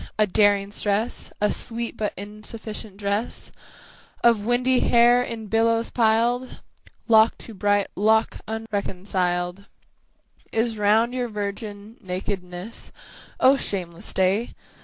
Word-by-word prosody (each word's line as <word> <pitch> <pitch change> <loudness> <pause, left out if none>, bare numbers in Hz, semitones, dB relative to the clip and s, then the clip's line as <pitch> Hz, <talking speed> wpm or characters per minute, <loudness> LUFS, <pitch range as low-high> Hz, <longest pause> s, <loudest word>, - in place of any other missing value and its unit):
a 215 - +4
daring 205 0 +2
stress, 210 +3 -1
A 210 - +2
sweet 235 0 -2
but 215 -2 -2
insufficient 215 0 -7
dress 205 +3 -3 0.7
Of 230 -3 +4
windy 250 +1 +3
hair 240 +1 +5
in 230 -3 -5
billows 225 +2 +1
piled 235 +2 +1 0.5
Lock 220 -1 +5
to 225 - -10
bright 205 0 +1
lock 220 +2 +2
unreconciled 195 -4 -2 0.9
Is 225 0 0
round 220 +3 +3
your 250 -1 -1
virgin 205 +1 -6
nakedness, 185 +2 -5 0.5
O 270 +2 +6
shameless 175 -8 -2
day! 195 +5 +1
215 Hz, 110 wpm, -24 LUFS, 200-230 Hz, 0.9 s, O